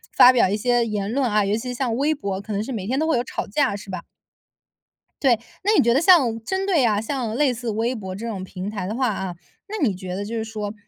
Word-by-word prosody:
发 250 - +9
表 250 -6 +4
一 205 - +1
些 240 +2 +2
言 210 -2 -2
论 260 0 +1
啊， 210 -1 +2
尤 200 +2 0
其 250 +2 -4
像 245 -2 -1
微 295 +4 +1
博 200 -7 -3
可 210 +2 -6
能 200 +1 -1
是 265 - -6
每 210 -5 -4
天 260 +3 0
都 315 - +1
会 320 - +2
有 240 - 0
吵 - - -4
架 250 0 +1
是 205 0 -9
吧？ 185 - -5 1.2
对。 245 -5 +4 0.2
那 410 - +3
你 - - +5
觉 235 0 +3
得 275 - +3
像 270 - +5
针 380 +5 -2
对 335 -10 +3
啊 210 -2 +2
像 235 -2 -3
类 270 -1 +2
似 240 0 -5
微 230 +4 -1
博 190 -4 -6
这 230 +4 -6
种 195 -5 -4
平 190 +1 -6
台 200 -4 -4
的 215 - -3
话 255 0 +1
啊， 190 -4 -3 0.3
那 420 -6 -3
你 205 - 0
觉 185 -1 -6
得 200 - -3
就 220 +3 -5
是 225 - -1
说， 215 -2 -5
225 Hz, 285 characters per minute, -23 LUFS, 205-255 Hz, 1.2 s, 发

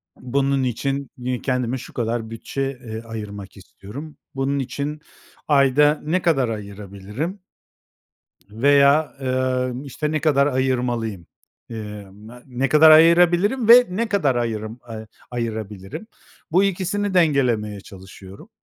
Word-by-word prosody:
Bunun 135 +1 0
için, 135 +2 -2
iii, 125 0 -3
kendime 125 -1 -1
şu - - -11
kadar 115 -1 -2
bütçe, 135 +4 -4
eee, 110 0 -6
ayırmak 105 -4 -8
istiyorum. 120 +10 -11 0.2
Bunun 135 +1 -1
için 140 +3 -4 0.5
ayda 145 +1 +4
ne 175 +5 0
kadar 135 -9 +1
ayırabilirim 105 - -6 1.1
veya, 140 +6 +3
emm, 130 0 -1
işte 150 +2 -4
ne 155 - 0
kadar 140 -3 +3
ayırmalıyım? 120 - -1 0.4
Eee, 105 -3 -8
me 110 +5 -14
ne 130 +1 -2
kadar 155 +3 +7
ayırabilirim 175 +9 +5
ve 245 +1 +9
ne 220 +5 -2
kadar 165 - +1
ayırım 115 -1 -3
eee, 110 -1 -7 0.2
ayırabilirim? 110 - -5 0.4
Bu 185 +5 +4
ikisini 195 +1 -1
dengelemeye 125 - +1
çalışıyorum. 95 - -13
130 Hz, 120 wpm, -22 LUFS, 110-150 Hz, 1.1 s, ve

